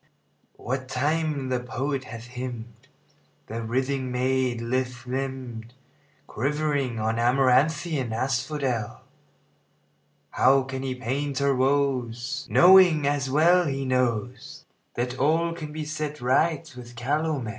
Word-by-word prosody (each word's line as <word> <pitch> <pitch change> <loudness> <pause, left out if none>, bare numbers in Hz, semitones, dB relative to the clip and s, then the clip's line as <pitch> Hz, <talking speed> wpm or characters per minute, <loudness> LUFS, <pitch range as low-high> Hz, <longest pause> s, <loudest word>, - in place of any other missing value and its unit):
What 130 +2 -4
time 145 +1 -1
the 125 -1 0
poet 130 +2 -3
hath 115 0 -9
hymned 125 -2 -7 0.6
The 115 +1 -5
writhing 130 +3 -1
maid, 125 -1 0
lithe 125 +1 -2
limbed, 125 -3 -5 0.5
Quivering 140 -2 -1
on 110 +1 -1
amaranthine 135 +3 +2
asphodel, 130 -1 -2 1.3
How 135 +1 +4
can 130 0 -5
he 130 -1 -3
paint 135 +3 -3
her 140 0 +2
woes, 130 -1 0
Knowing, 180 -5 +6
as 140 -1 0
well 170 +5 +4
he 135 -1 -2
knows, 125 -2 -2 0.3
That 125 +2 -3
all 165 +4 +2
can 155 -3 -7
be 155 0 -5
set 150 -1 -4
right 155 +5 +1
with 120 -1 -11
calomel? 145 +1 -1
130 Hz, 115 wpm, -25 LUFS, 125-145 Hz, 1.3 s, Knowing